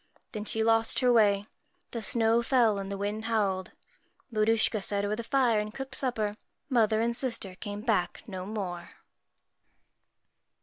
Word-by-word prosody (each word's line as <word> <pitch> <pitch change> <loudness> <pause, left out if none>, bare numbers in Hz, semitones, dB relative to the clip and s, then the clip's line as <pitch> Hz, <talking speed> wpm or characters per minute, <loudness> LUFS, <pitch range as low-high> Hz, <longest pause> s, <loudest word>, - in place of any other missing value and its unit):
Then 210 -2 -5
she 220 +1 0
lost 225 +2 +3
her 250 -1 +4
way. 205 -3 +4 0.5
The 230 - -4
snow 225 +1 +2
fell, 230 -4 +3
and 195 0 -5
the 200 - -3
wind 205 +2 -3
howled. 200 -5 0 0.6
Maruschka 220 0 +2
sat 200 +1 +1
over 205 +1 -1
the 235 - -5
fire 245 -3 +2
and 210 0 -3
cooked 270 +3 -7
supper. 220 -6 -1 0.3
Mother 220 -4 +3
and 235 +1 +1
sister 235 -7 -1
came 205 +2 -6
back 215 -6 0
no 185 -3 -6
more. 185 -5 -5
220 Hz, 150 wpm, -29 LUFS, 205-230 Hz, 0.6 s, her